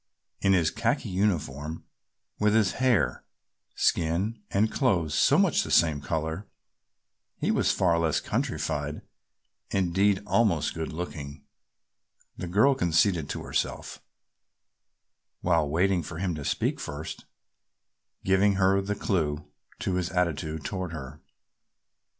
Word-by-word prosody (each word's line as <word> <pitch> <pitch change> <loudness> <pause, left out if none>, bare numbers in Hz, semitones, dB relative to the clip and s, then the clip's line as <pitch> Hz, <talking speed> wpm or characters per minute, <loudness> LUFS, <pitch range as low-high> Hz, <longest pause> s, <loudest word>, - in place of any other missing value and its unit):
In 95 - +4
his 85 -4 +3
khaki 115 +1 -1
uniform, 80 -6 -1 0.6
with 105 0 +3
his 110 -3 +3
hair, 100 - +2 0.5
skin 95 +7 0
and 105 +3 +1
clothes 90 - +1
so - - +4
much - - +3
the - - -5
same 80 -4 +3
color, 80 +5 -3 0.9
he - - 0
was - - +2
far 85 -3 +2
less 80 -2 +1
countrified, - - -2 0.7
indeed, 95 +2 +2
almost 105 -9 +2
good 80 -1 -4
looking 75 -4 -6 0.9
the 90 - -5
girl 110 +11 +4
conceded 85 - +2
to - - -4
herself, - - -3 1.4
while 80 -4 +2
waiting 90 +3 +2
for 80 +1 -7
him 90 0 -1
to 75 -2 -6
speak - - -1
first, 75 +2 -6 1.0
giving 95 +1 +3
her 95 +1 +3
the 105 +1 -2
clue 75 -7 -1 0.3
to 95 - -2
his 90 -1 -1
attitude 80 -3 -1
toward 95 -4 -4
her. 65 -4 -8
90 Hz, 120 wpm, -27 LUFS, 80-100 Hz, 1.4 s, In